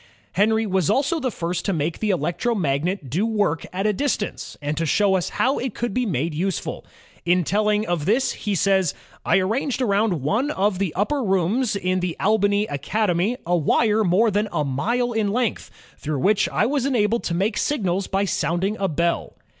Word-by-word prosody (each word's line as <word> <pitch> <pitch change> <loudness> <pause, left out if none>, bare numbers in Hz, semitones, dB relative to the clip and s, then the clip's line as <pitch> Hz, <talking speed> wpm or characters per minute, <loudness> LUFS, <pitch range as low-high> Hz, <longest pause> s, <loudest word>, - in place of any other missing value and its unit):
Henry 220 +3 +2
was 190 -5 0
also 285 +4 +1
the 265 - -1
first 170 -4 -3
to 195 - +1
make 160 0 -2
the 215 - -1
electromagnet 175 - -1
do 160 - -1
work 205 -8 0
at 190 +2 -3
a 210 - +3
distance, 220 -2 -3
and 145 +1 -3
to 165 - -1
show 195 +5 +2
us 185 -1 -1
how 265 +3 +1
it 250 -3 -4
could 240 -4 -2
be 250 +1 0
made 160 -2 -1
useful. 185 +4 -3 0.4
In 175 +1 +2
telling 210 +4 +1
of 175 -7 -2
this 230 +8 +2
he 205 -2 -3
says: 190 -3 +2 0.3
"I - - +3
arranged 230 +9 0
around 200 - +1
one 220 - +1
of 200 -7 0
the 195 -4 0
upper 270 +9 0
rooms 200 +5 +1
in 185 -1 0
the 180 -2 -3
Albany 205 0 +2
Academy 190 - 0
a 175 +1 +2
wire 210 +7 +2
more 210 +5 +3
than 210 +2 0
a 150 -4 0
mile 235 - 0
in 220 -3 0
length, 240 0 -1 0.3
through 150 -1 -3
which 200 +9 +2
I - - +1
was 275 +1 0
enabled 235 -3 +1
to 170 - -1
make 200 +5 0
signals 195 -8 -1
by 195 +1 0
soimding 190 +3 -1
a 195 - +1
bell." 170 +2 -1
200 Hz, 190 wpm, -22 LUFS, 175-220 Hz, 0.4 s, a